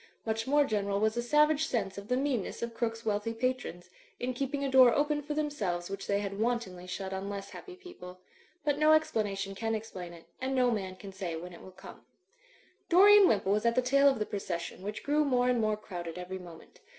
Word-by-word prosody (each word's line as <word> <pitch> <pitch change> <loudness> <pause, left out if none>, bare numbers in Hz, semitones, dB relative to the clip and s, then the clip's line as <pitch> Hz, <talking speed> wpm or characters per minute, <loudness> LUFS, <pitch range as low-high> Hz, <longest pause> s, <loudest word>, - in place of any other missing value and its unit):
Much 225 +1 -2
more 290 +1 +4
general 200 -4 -1
was 220 +1 +1
a 240 - 0
savage 300 +4 +3
sense 195 -6 -2
of 200 0 -8
the 250 - +1
meanness 260 -6 -2
of 235 0 -4
Crooke's 225 -1 -3
wealthy 215 +1 -1
patrons, 225 -8 -3 0.3
in 250 +1 -2
keeping 275 +2 -3
a 275 - -1
door 260 -2 +8
open 295 0 +1
for 295 +1 -5
themselves 195 -13 -2
which 195 0 -5
they 200 0 +1
had 200 0 -5
wantonly 220 -6 -2
shut 190 +1 -5
on 190 +1 -4
less 200 -1 -6
happy 370 -2 -10
people. 185 - -12 0.5
But 290 -1 +1
no 305 0 +6
explanation 205 -10 0
can 225 +3 -2
explain 195 -5 -7
it; 170 -1 -13 0.2
and 265 +1 -1
no 250 -1 +3
man 190 -4 -3
can 195 0 -10
say 185 -4 -4
when 175 +2 -8
it 170 - -12
will - - -11
come. 190 +1 -13 0.9
Dorian 400 +2 +8
Wimpole 195 - +2
was 210 - 0
at 235 0 +2
the 255 - +4
tail 275 +2 +5
of 270 - 0
the 210 - -1
procession, 175 -4 -5
which 210 +2 -6
grew 295 +1 +2
more 250 -3 +2
and 245 -2 +2
more 215 -1 +1
crowded 175 -5 -7
every 180 +1 -6
moment. 170 -3 -13
220 Hz, 220 wpm, -30 LUFS, 195-265 Hz, 0.9 s, door